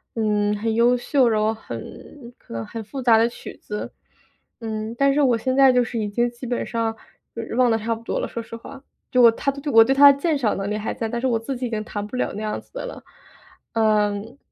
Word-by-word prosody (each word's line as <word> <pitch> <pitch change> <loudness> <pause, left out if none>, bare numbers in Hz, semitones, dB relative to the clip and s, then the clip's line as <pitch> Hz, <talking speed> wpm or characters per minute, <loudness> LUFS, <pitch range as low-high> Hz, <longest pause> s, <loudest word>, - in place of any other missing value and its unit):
嗯， 210 -2 +1
很 220 +1 -1
优 240 +2 +4
秀， 260 0 +2
然 215 -2 +2
后 220 +1 +1
很 240 +3 -10
可 - - -14
能 115 0 -4
很 225 -1 -7
复 265 +5 -7
杂 230 -3 +5
的 230 +1 +4
曲 - - -10
子。 210 0 -6 0.7
嗯， 220 0 -4
但 275 0 +3
是 295 - +2
我 250 -4 +3
现 260 +3 -1
在 270 -1 +6
就 250 0 +4
是 230 0 -4
已 210 -1 -2
经 240 +3 0
基 240 +1 -10
本 245 - -2
上 230 -1 -2 0.4
就 230 - -4
是 225 - -6
忘 250 -1 +4
得 225 - +2
差 225 +1 -2
不 225 - -12
多 - - -2
了， - - -2
说 235 - -5
实 230 0 -9
话， 270 +4 -11 0.3
就 250 - +4
我 230 -1 +8
它 275 +4 -2 0.2
我 225 0 +9
对 265 +4 +2
它 285 0 +9
鉴 295 +3 0
赏 225 -7 0
能 195 +1 -3
力 - - -1
还 215 - -3
在， 225 - -3
但 235 0 -3
是 260 - +1
我 235 -2 +1
自 260 +4 -4
己 250 0 -3
已 - - -6
经 215 -2 -3
弹 205 -2 -5
不 250 - -8
了 - - -1
那 210 - -6
样 215 - -2
子 - - -30
的 - - -5
了。 - - -9 0.7
嗯， 215 +1 +1
230 Hz, 275 characters per minute, -22 LUFS, 220-255 Hz, 0.7 s, 我